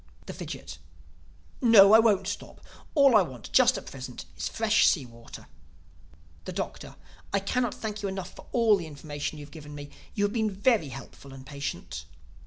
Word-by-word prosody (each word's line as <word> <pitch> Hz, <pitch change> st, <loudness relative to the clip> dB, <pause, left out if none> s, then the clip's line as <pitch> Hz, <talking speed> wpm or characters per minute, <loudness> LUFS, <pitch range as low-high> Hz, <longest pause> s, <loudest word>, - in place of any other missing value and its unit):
The -, -, -7 dB
Fidgit: -, -, -8 dB, 0.8 s
"No, 215 Hz, -5 st, +8 dB
I 220 Hz, -, +10 dB
won't 205 Hz, -4 st, +3 dB
stop. 205 Hz, -, -6 dB, 0.4 s
All 275 Hz, -5 st, +6 dB
I 210 Hz, -, +8 dB
want 130 Hz, -10 st, -7 dB
just 255 Hz, -1 st, +5 dB
at -, -, -8 dB
present 130 Hz, -6 st, -8 dB
is 85 Hz, -, -3 dB
fresh 220 Hz, -1 st, +3 dB
sea 145 Hz, -8 st, +2 dB
water." 115 Hz, -1 st, -12 dB, 1.0 s
The -, -, -5 dB
Doctor: -, -, -5 dB, 0.4 s
"I 200 Hz, -, +2 dB
cannot 240 Hz, +4 st, -1 dB
thank 215 Hz, -1 st, -5 dB
you 200 Hz, -, -2 dB
enough 190 Hz, -1 st, -6 dB
for -, -, -13 dB
all 230 Hz, -4 st, +4 dB
the 170 Hz, -4 st, -6 dB
information 145 Hz, 0 st, -5 dB
you 145 Hz, -, -8 dB
have -, -, -17 dB
given 150 Hz, -2 st, -10 dB
me. 145 Hz, 0 st, -9 dB, 0.2 s
You 205 Hz, -, 0 dB
have 205 Hz, -, +1 dB
been 220 Hz, -2 st, +1 dB
very 205 Hz, -, +2 dB
helpful 135 Hz, +1 st, -11 dB
and 135 Hz, 0 st, -11 dB
patient." 140 Hz, +1 st, -6 dB
195 Hz, 185 wpm, -28 LUFS, 145-220 Hz, 1.0 s, I